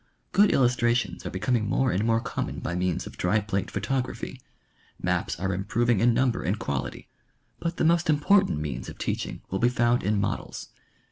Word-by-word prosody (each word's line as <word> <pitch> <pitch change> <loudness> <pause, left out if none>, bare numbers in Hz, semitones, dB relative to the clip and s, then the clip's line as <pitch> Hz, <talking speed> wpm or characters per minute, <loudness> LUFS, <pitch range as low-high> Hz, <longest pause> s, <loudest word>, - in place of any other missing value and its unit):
Good 205 0 +5
illustrations 120 -5 +1
are - - -2
becoming 105 +4 0
more 130 +5 +2
and 95 - 0
more 115 0 +3
common - - -4
by 85 - -3
means 90 -1 -1
of - - -10
dry 95 +5 +2
plate 100 -1 -2
pho - - -3
tography; 130 +4 -3 0.6
maps - - -1
are 95 +1 -1
improving 110 +4 +1
in 120 +3 +4
number 125 0 +1
and 95 +6 -1
quality; 70 - -4 0.5
but 170 0 -3
the - - +1
most 170 0 +3
important 190 - +4
means 65 -5 -4
of - - -10
teaching - - -3
will 95 - -1
be 120 - +4
found 120 0 +2
in 105 +2 +1
models. 100 - -3
115 Hz, 185 wpm, -26 LUFS, 95-125 Hz, 0.6 s, Good